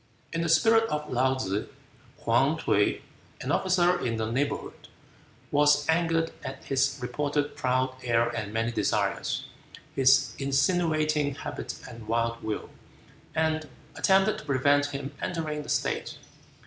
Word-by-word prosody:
In 165 - -1
the 170 - -1
spirit 225 +8 +5
of 150 0 -2
Laou 130 +1 +2
tsze, 100 -4 -2 0.6
Hwuy - - +2
T'uy, - - +1 0.4
an - - -3
officer 180 -1 +2
in 115 -2 -1
the 110 0 -2
neighborhood, 140 +4 -3 0.6
was 145 0 +4
angered 165 0 +2
at 130 0 -7
his 135 0 +1
reported 145 +3 -1
"proud 130 0 0
air 115 -1 +2
and 110 -3 -4
many 115 +2 0
desires, - - -1 0.5
his 135 -2 +4
insinuating 150 0 +1
habit - - -6
and 115 -3 -10
wild 115 +1 0
will," 110 -1 -4 0.6
and 155 -1 0 0.3
attempted 195 +2 +3
to - - -12
prevent 145 +1 +3
him 140 0 -5
entering 155 -3 -2
the 145 - -10
state. - - -1
145 Hz, 135 wpm, -27 LUFS, 125-160 Hz, 0.6 s, spirit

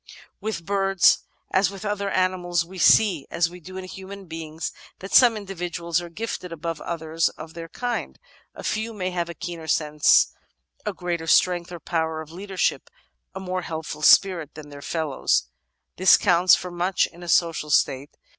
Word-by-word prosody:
With 210 -6 -4
birds, 195 -1 +3 0.3
as 190 -1 +3
with 195 +1 -9
other 205 -1 -1
animals, 180 -3 0
we 185 +2 -10
see, 175 -4 +4
as 170 0 0
we 180 - -11
do 185 +2 -10
in 190 - -5
human 190 +1 -9
beings, 160 -1 -6 0.3
that 195 - -9
some 240 -3 +7
individuals 175 -4 -3
are 175 - -8
gifted 180 -1 -5
above 165 -1 -5
others 160 -1 -1
of 160 0 -11
their 165 -1 -8
kind. 245 +3 -4 0.4
A - - -9
few 220 +1 -2
may 185 -2 -2
have 175 -1 -2
a 170 - -7
keener 170 -1 -7
sense, 150 -1 +3 0.6
greater 170 -2 -3
strength 175 +1 +3
or 175 - -7
power 160 -1 -2
of 160 0 -9
leadership, 190 +2 -2 0.5
a - - -4
more 185 -1 -3
helpful 160 -2 -6
spirit 170 -3 +4
than 150 -1 -10
their 145 -1 -10
fellows. 155 -3 0 0.5
This 185 +1 +7
counts 180 -2 +5
for 180 - -6
much 175 +2 +1
in 175 - -13
a 175 - -7
social 165 -3 +2
state. 135 0 +2
175 Hz, 170 wpm, -24 LUFS, 165-190 Hz, 0.6 s, some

